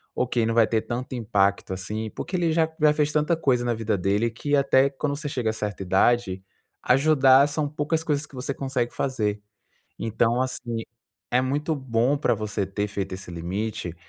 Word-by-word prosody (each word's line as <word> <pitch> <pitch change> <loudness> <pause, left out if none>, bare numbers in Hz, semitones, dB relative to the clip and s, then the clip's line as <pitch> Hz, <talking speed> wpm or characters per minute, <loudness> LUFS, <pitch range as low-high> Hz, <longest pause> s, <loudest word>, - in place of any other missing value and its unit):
ok, 120 -2 +1
não 115 - 0
vai 115 -1 +5
ter 110 -1 +1
tanto 125 +4 -5
impacto 100 -5 +1
assim, 105 +4 -4
porque 185 - -5
ele 170 -2 +1
já 160 -1 +2
já 150 -1 +5
fez 150 0 +1
tanta 150 +3 +2
coisa 130 -6 +1
na 120 - +1
vida 110 -2 -1
dele 100 +5 +1
que, 145 +6 -1
até 140 -1 +4
quando 140 +1 -3
você 145 +1 -5
chega 125 -5 -1
a - - -7
certa 105 -2 -4
idade, 95 +1 +2 0.4
ajudar 135 0 +5
são 150 0 -1
poucas 150 +2 -1
coisas 150 -2 -1
que 145 - -16
você 130 +2 -3
consegue 130 -3 -2
fazer. 105 -6 -1 0.6
Então, 115 +2 +1
assim, 120 -3 -3 0.5
é 125 - +3
muito 145 +5 -1
bom 130 0 +1
para 120 -4 +2
você 105 -2 -3
ter 100 +2 -3
feito 100 -2 -4
esse 95 -1 -9
limite 90 +1 -4
120 Hz, 185 wpm, -25 LUFS, 105-140 Hz, 0.6 s, vai